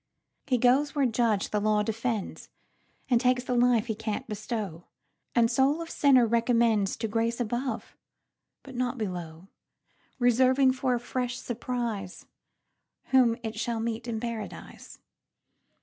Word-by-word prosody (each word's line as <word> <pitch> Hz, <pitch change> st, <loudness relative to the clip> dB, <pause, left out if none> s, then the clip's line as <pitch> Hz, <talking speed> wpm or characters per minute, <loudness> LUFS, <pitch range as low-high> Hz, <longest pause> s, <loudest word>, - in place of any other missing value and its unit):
He 255 Hz, -3 st, +2 dB
goes 265 Hz, +4 st, +3 dB
where 280 Hz, -2 st, +2 dB
judge 225 Hz, -4 st, +1 dB
the 210 Hz, -, +1 dB
law 210 Hz, 0 st, +2 dB
defends, 225 Hz, -1 st, -3 dB, 0.6 s
And 245 Hz, -3 st, +3 dB
takes 250 Hz, 0 st, +2 dB
the 250 Hz, -, -2 dB
life 240 Hz, -2 st, +3 dB
he 225 Hz, -, -2 dB
can't 215 Hz, 0 st, -4 dB
bestow, 210 Hz, -5 st, -5 dB, 0.5 s
And 230 Hz, -1 st, +4 dB
soul 270 Hz, +5 st, +2 dB
of 330 Hz, 0 st, -6 dB
sinner 260 Hz, -5 st, +4 dB
recommendsTo 230 Hz, -2 st, +2 dB
grace 230 Hz, +2 st, -1 dB
above, 240 Hz, +1 st, -3 dB, 0.7 s
but 265 Hz, -, -11 dB
not 250 Hz, +1 st, -2 dB
below; 175 Hz, -5 st, -5 dB, 0.7 s
Reserving 260 Hz, +2 st, +4 dB
for 255 Hz, -1 st, 0 dB
a -, -, -2 dB
fresh 250 Hz, 0 st, -3 dB
surpriseWhom 235 Hz, -5 st, -4 dB, 1.2 s
it 220 Hz, -1 st, -5 dB
shall 230 Hz, 0 st, -2 dB
meet 230 Hz, +1 st, -3 dB
in 225 Hz, -2 st, -2 dB
Paradise. 230 Hz, -2 st, -7 dB
235 Hz, 130 wpm, -28 LUFS, 220-250 Hz, 1.2 s, And